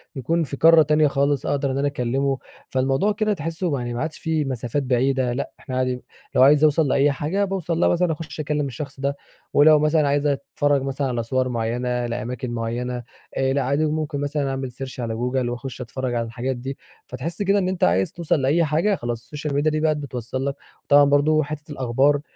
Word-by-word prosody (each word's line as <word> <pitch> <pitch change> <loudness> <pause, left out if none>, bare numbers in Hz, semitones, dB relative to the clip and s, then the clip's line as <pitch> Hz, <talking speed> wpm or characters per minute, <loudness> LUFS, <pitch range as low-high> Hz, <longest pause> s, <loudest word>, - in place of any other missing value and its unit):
يكون 165 +6 0
في 140 -1 -5
قارة 165 +1 +7
تانية 150 +1 +4
خالص 140 0 0
أقدر 140 -1 0
إن 130 - -2
أنا 145 +1 +1
أكلمه، 135 +1 0 0.3
فالموضوع 135 +9 +1
كده 215 0 +1
تحسه 165 0 -3
ما 140 - 0
يعني 120 -1 -4
ما 120 - -3
عادش 155 0 -3
في 160 -2 0
مسافات 130 +1 -2
بعيدة 130 0 +1
لأ، 130 - -3
إحنا 130 -2 -5
عادي 130 -1 -1 0.3
لو - - +5
عايز 145 +2 +6
أوصل 155 0 +4
لأي 140 +2 +3
حاجة 165 +9 -1
باوصل 175 -4 -2
لها - - +4
مثلًا 175 -1 +2
أخش 160 0 -6
أكلم 150 -1 -1
الشخص 140 +1 -7
ده، 140 +1 -1 0.4
ولو 150 +1 +7
مثلًا 150 0 +3
عايزة 145 +1 +2
أتفرج 140 0 0
مثلًا 135 +1 -2
على 120 -2 -1
صور 130 +2 0
معينة 120 0 -2 0.2
لأماكن 120 +1 -4
معينة 120 +1 -3 0.3
آآ، 135 0 +1
لأ 140 - +1
عادي 140 +4 +1
وممكن 155 -2 -2
مثلًا 145 -1 -1
أعمل 135 -1 -3
search 130 +1 -8
على 115 -2 -2
جوجل 125 +1 -1
وأخش 125 +1 -6
أتفرج 125 +1 -4
على 115 0 0
الحاجات 120 +3 -3
دي. 130 +3 -6 0.3
فتحس 155 +9 -5
كده 200 0 +3
إن 185 -1 0
أنت 185 -1 -2
عايز 95 +3 +3
توصل 170 -4 0
لأي 145 +6 +3
حاجة 165 +7 +1
خلاص 120 -6 -4
السوشيال 145 +4 -5
ميديا 150 +2 +2
دي 155 - 0
بقى 155 0 +2
بتوصل 130 -2 -4
لك 140 0 -1 0.3
وطبعًا 145 0 +6
برضه 145 +2 +3
حتة 150 +1 -7
الأخبار، 135 +2 +2
140 Hz, 205 wpm, -23 LUFS, 125-155 Hz, 0.4 s, قارة